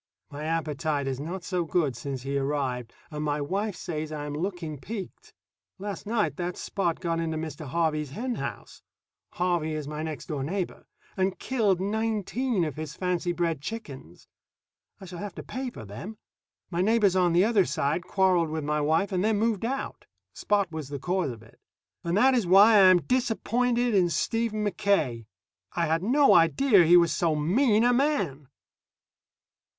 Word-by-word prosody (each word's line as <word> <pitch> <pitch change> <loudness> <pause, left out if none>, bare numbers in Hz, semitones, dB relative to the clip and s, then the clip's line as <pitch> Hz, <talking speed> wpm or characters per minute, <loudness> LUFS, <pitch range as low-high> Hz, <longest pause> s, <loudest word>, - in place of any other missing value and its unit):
My 145 +2 -6
appetite 155 -2 -1
is 135 -1 -3
not 170 +5 -5
so 180 0 -1
good 155 -5 0
since 135 0 -5
he 140 +1 -3
arrived, 135 -4 -2 0.2
and 150 0 -4
my 150 0 -1
wife 195 +7 -2
says 155 -4 -5
I 150 -1 -4
am 145 - -5
looking 165 -2 -4
peaked. 205 +3 -8 0.5
Last 200 -1 -6
night 220 -1 0
that 175 -1 -3
Spot 175 -4 -2
got 165 -2 -1
into 160 -1 -2
Mr. 155 -1 -6
Harvey's 155 -1 0
hen 240 - -3
house - - -6 0.5
(Harvey 175 -3 0
is 155 -2 -4
my 150 +1 -5
next 155 -2 -5
door 150 -4 -4
neighbor) 180 +5 -4 0.3
and 190 0 0
killed 215 -8 +1
nineteen 220 +1 -1
of 150 -3 -5
his 155 -1 -6
fancy 180 -1 -1
bred 170 -4 -1
chickens. 145 - -8 0.7
I 195 - -10
shall 175 -1 -8
have 205 -1 -6
to - - -7
pay 260 0 -4
for 115 - -10
them. 115 - -8 0.5
My 170 0 0
neighbors 210 -2 +3
on 180 -2 +3
the 175 +4 +4
other 215 -4 +3
side 150 +3 -1
quarreled 185 -4 +2
with 155 0 -3
my 150 +1 0
wife 160 +7 +1
and 185 -1 0
then 215 0 +2
moved 220 -1 0
out. 270 +3 -4 0.3
Spot 200 -4 0
was 155 -4 -6
the 145 - -4
cause 180 +2 -1
of 115 -2 -8
it. 110 - -20 0.4
And 170 +2 0
that 260 +4 +5
is 235 -8 +1
why 200 +5 +7
I 195 -3 +8
am 180 -2 +5
disappointed 245 - +1
in 185 -3 +3
Stephen 215 +5 -1
Mackaye. 175 - 0 0.5
I 170 - 0
had 160 +1 +1
no 275 +8 +4
idea 185 +4 +5
he 175 +2 +7
was 170 -1 +4
so 165 -3 +1
mean 210 - +3
a 245 +1 +4
man. 200 - 0
175 Hz, 175 wpm, -27 LUFS, 150-205 Hz, 0.7 s, I